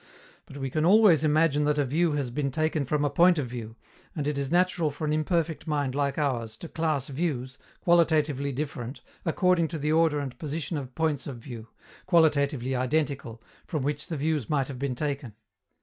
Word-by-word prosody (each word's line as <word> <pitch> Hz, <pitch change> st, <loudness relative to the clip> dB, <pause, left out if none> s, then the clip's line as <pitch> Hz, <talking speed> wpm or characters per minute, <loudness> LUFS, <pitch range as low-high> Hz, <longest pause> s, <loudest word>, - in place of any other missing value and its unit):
But 140 Hz, -, -10 dB
we 135 Hz, -2 st, -4 dB
can 155 Hz, +2 st, 0 dB
always 185 Hz, -3 st, +6 dB
imagine 150 Hz, -1 st, +3 dB
that 150 Hz, 0 st, +1 dB
a 145 Hz, -, +2 dB
view 160 Hz, +4 st, +1 dB
has 140 Hz, -4 st, -2 dB
been 140 Hz, +2 st, -1 dB
taken 155 Hz, 0 st, 0 dB
from 150 Hz, +2 st, 0 dB
a -, -, +2 dB
point 175 Hz, +4 st, +5 dB
of 145 Hz, -, 0 dB
view, 115 Hz, -2 st, -7 dB, 0.4 s
and 150 Hz, -4 st, -2 dB
it 150 Hz, -, 0 dB
is 140 Hz, -1 st, -2 dB
natural 175 Hz, -2 st, +2 dB
for 145 Hz, +2 st, -5 dB
an 150 Hz, -, 0 dB
imperfect 160 Hz, +1 st, -1 dB
mind 145 Hz, -4 st, 0 dB
like 140 Hz, 0 st, -1 dB
ours 120 Hz, -7 st, -1 dB
to 170 Hz, -, -8 dB
class 155 Hz, -5 st, -1 dB
views, 135 Hz, -4 st, -3 dB, 0.2 s
qualitatively 155 Hz, -5 st, +2 dB
different, 135 Hz, -2 st, -5 dB, 0.2 s
according 175 Hz, 0 st, +2 dB
to 165 Hz, -, -5 dB
the 150 Hz, +1 st, -1 dB
order 160 Hz, -1 st, +3 dB
and 135 Hz, -4 st, -5 dB
position 155 Hz, +1 st, -3 dB
of 130 Hz, -4 st, -6 dB
points 155 Hz, -4 st, -1 dB
of 135 Hz, -4 st, -6 dB
view, 115 Hz, -2 st, -9 dB, 0.4 s
qualitatively 140 Hz, -7 st, +2 dB
identical, 130 Hz, -3 st, -1 dB, 0.2 s
from 155 Hz, -6 st, -2 dB
which 145 Hz, 0 st, -2 dB
the 165 Hz, -4 st, -3 dB
views 150 Hz, -3 st, -1 dB
might 140 Hz, -3 st, 0 dB
have 130 Hz, -3 st, -6 dB
been 135 Hz, -2 st, -2 dB
taken. 140 Hz, -5 st, -3 dB
145 Hz, 195 wpm, -27 LUFS, 135-160 Hz, 0.4 s, always